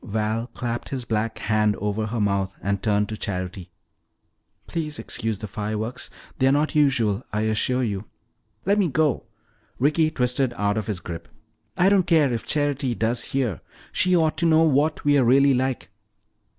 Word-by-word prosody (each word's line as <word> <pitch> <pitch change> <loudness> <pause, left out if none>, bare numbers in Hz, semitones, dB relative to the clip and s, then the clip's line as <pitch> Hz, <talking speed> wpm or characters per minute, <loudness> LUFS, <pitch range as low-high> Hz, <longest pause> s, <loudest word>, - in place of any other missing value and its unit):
Val 110 +1 -2
clapped 120 -1 -4
his 130 -3 -4
black 110 0 -1
hand 105 -1 +1
over 105 +2 -2
her 115 +2 -3
mouth 100 -2 0
and 100 0 -1
turned 105 -1 +1
to 110 - -5
Charity. 95 -2 -5 1.0
"Please 155 -3 -4
excuse 110 -2 -3
the 110 - -6
fireworks. 110 +4 -4 0.3
They 130 - +4
are - - +5
not 150 +2 +1
usual, 125 -9 +2
I 105 - -1
assure 110 +4 +1
you." 105 -3 -2 0.6
"Let 200 +3 +3
me 195 - +3
go!" 150 -2 0 0.5
Ricky 155 +4 +3
twisted 125 -3 0
out 105 0 +1
of 110 -2 -3
his 100 -5 -3
grip. 85 -1 -7 0.5
"I 180 - +4
don't 195 -3 +3
care 155 -7 +4
if 115 - -4
Charity 145 -4 0
does 115 +1 0
hear. 125 - -2 0.3
She 185 0 +2
ought 160 -3 +2
to 170 +2 +2
know 160 0 +5
what 155 0 +2
we're 145 -2 +4
really 135 +3 +5
like!" 130 -2 -1
120 Hz, 170 wpm, -24 LUFS, 105-145 Hz, 1.0 s, are